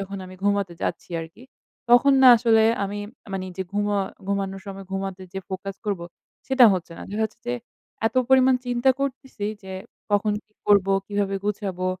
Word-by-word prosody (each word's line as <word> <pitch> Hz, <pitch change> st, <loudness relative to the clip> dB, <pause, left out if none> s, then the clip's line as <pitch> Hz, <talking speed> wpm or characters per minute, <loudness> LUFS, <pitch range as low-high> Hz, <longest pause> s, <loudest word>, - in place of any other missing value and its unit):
যখন 195 Hz, 0 st, -5 dB
আমি 185 Hz, -, -11 dB
ঘুমোতে 200 Hz, -3 st, +1 dB
যাচ্ছি 170 Hz, -, -3 dB
আরকি, 165 Hz, +8 st, -11 dB, 0.5 s
তখন 260 Hz, +3 st, +7 dB
না 255 Hz, -, +10 dB
আসলে 225 Hz, -1 st, +4 dB, 0.2 s
আমি 205 Hz, +1 st, -4 dB, 0.3 s
মানে 185 Hz, -1 st, -3 dB
যে 190 Hz, -, -1 dB
ঘুমা 205 Hz, 0 st, +1 dB, 0.3 s
ঘুমানোর 195 Hz, -1 st, -2 dB
সময় 195 Hz, 0 st, -7 dB
ঘুমাতে 195 Hz, -1 st, -4 dB
যেয়ে 190 Hz, -1 st, -6 dB
ফোকাস 190 Hz, +1 st, -5 dB
করবো, 185 Hz, -4 st, -2 dB, 0.4 s
সেটা 265 Hz, -2 st, +6 dB
হচ্ছে 175 Hz, -2 st, -3 dB
না। -, -, -7 dB
দেখা 220 Hz, +2 st, 0 dB
যাচ্ছে 220 Hz, -, -6 dB
যে 245 Hz, -, +1 dB, 0.5 s
এত 225 Hz, -, -1 dB
পরিমাণ 260 Hz, 0 st, +6 dB
চিন্তা 245 Hz, +2 st, +3 dB
করতেছি 265 Hz, -6 st, -3 dB, 0.2 s
যে 190 Hz, 0 st, -8 dB, 0.4 s
কখন 205 Hz, +1 st, +2 dB
কি 210 Hz, -, -41 dB
করবো? 200 Hz, -1 st, +4 dB
কীভাবে 200 Hz, -1 st, -1 dB
গুছাবো? 195 Hz, -3 st, -2 dB
200 Hz, 170 wpm, -24 LUFS, 190-220 Hz, 0.5 s, না